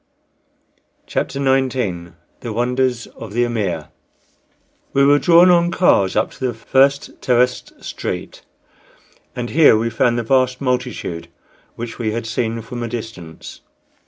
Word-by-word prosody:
CHAPTER 135 - -3
XIX 130 -11 0 0.3
THE 115 - -6
WONDERS 125 +1 0
OF 110 -3 -11
THE 120 +2 +2
"AMIR" 100 -10 -2 1.0
We 140 0 +4
were 145 +1 +5
drawn 175 +2 +6
on 175 0 +4
cars 100 - +2
up 110 - +1
to - - -16
the 120 - -4
first 135 +4 +1
terraced 125 0 0
street, - - -5 0.9
and 120 -1 -4
here 150 -7 +6
we 115 +1 -1
found 120 +1 +1
the 120 - -1
vast 130 +1 +1
multitude 125 -10 -3 0.5
which 115 0 -7
we 110 -2 -1
had 115 0 -3
seen 115 0 -2
from 120 +1 -7
a 120 - -2
distance. 110 -9 -8
120 Hz, 135 wpm, -19 LUFS, 110-130 Hz, 1.0 s, drawn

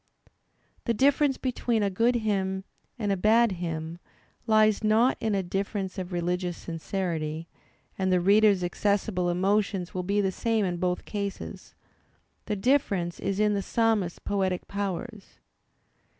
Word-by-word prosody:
The 235 - +1
difference 280 +2 +3
between 240 -3 0
a 200 - +1
good 230 +6 +2
hymn 195 -4 -1 0.3
and 210 -4 -1
a - - +2
bad 220 +4 +4
hymn 165 -2 -4 0.5
lies 215 -1 +4
not 220 +4 +4
in 220 -2 0
a 195 - 0
difference 195 +1 -3
of 185 0 -5
religious 175 0 -1
sincerity, 165 -2 -3 0.5
and 190 -1 +1
the 180 - +4
reader's 200 0 +4
accessible 185 0 0
emotions 190 0 0
will 185 - -2
be 200 +3 0
the 195 -2 +1
same 225 +1 0
in 175 -1 -2
both 180 0 -1
cases; 200 -2 -6 0.7
the 210 - 0
difference 200 -7 +1
is 195 0 -2
in 210 0 +3
the 200 - 0
psalmists' 215 -5 +1
poetic 190 -3 -1
powers. 200 +2 -5
195 Hz, 140 wpm, -27 LUFS, 180-215 Hz, 0.7 s, bad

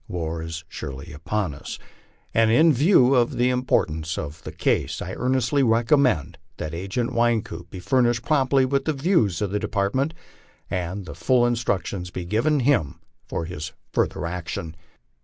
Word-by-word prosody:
War 80 -2 -3
ia 80 - -6 0.2
surely 70 +1 -7
upon 90 +3 -2
us, 70 - -7 0.6
and 115 -1 +4
in 155 +7 +5
view 140 -2 +5
of 120 -2 +2
the 125 +1 +3
importance 80 -11 0
of 75 +2 -6
the - - -7
case, - - 0
I - - -5
earnestly 130 +2 +1
recommend 115 - +2 0.2
that 80 - -5
Agent 95 +8 -2
Wynkoop 115 -8 0
be 95 - -8
furnished 120 +3 +1
promptly 135 -3 +3
with 135 +1 0
the 155 - +1
views 135 - +1
of 100 - -2
the 105 - 0
Department, 110 +11 -1 0.6
and 90 +2 -3
that 85 - -9
full 120 +8 +3
instructions 100 -6 -1
be 90 0 -6
given 120 - +1
him 120 - +1 0.3
for 85 - -3
his 80 -2 -6 0.2
future - - 0
action. 85 -2 -5
110 Hz, 160 wpm, -24 LUFS, 85-130 Hz, 0.6 s, in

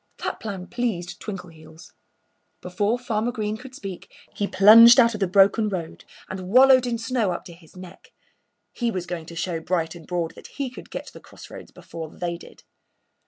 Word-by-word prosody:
That - - -3
plan 195 -4 -6
pleased 205 -7 -4
Twinkleheels. 170 -5 -10 0.7
Before 205 +6 -1
Farmer 235 -1 -2
Green 215 -3 -3
could 255 +3 -12
speak 195 -8 -9 0.2
he 205 - -1
plunged 230 +6 +8
out 235 -2 +5
of 210 - -5
the 195 - +1
broken 200 +4 +4
road 175 -5 -6 0.2
and 185 -1 -7
wallowed 255 +2 +6
in 235 -1 -1
snow 225 -3 -1
up 175 - -5
to 175 - -11
his 165 0 -20
neck. 185 - -13 0.6
He 240 -2 -1
was 185 -5 -4
going 170 -3 -6
to 170 - -10
show 165 0 -3
Bright 165 -1 -2
and 170 -3 -13
Broad 175 -2 -3
that - - -13
he 275 -3 -3
could - - -12
get - - -6
to - - -13
the - - -11
crossroads - - -13
before 160 -2 -9
they 170 +1 -4
did. - - -16
195 Hz, 190 wpm, -23 LUFS, 175-230 Hz, 0.7 s, plunged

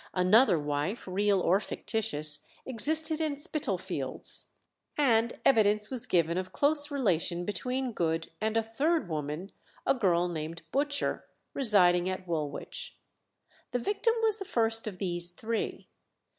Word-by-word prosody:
Another 185 +2 +5
wife, 150 +8 -3
real 200 +1 +2
or 185 +2 +3
fictitious, 155 -10 -2 0.3
existed 310 +6 +2
in 305 -3 -1
Spitalfields, 305 0 -2 0.5
and 235 -5 +2
evidence 210 -3 +3
was 250 -2 -1
given 170 0 +2
of 185 0 -6
close 290 0 +2
relation 175 - 0
between 250 +5 -2
Good 165 -5 -2
and 220 +1 0
a 225 - +2
third 285 - 0
woman, 155 +4 -4 0.3
a - - +4
girl 180 -8 +2
named 165 -1 -5
Butcher, 285 +1 0 0.3
residing 185 -8 +5
at 185 -1 -5
Woolwich. 170 - -4 0.8
The - - +2
victim 410 - 0
was 440 -1 +2
the - - -3
first 225 -5 0
of 200 -4 -5
these 175 -2 0
three. 220 +6 -4
215 Hz, 130 wpm, -29 LUFS, 175-270 Hz, 0.8 s, Another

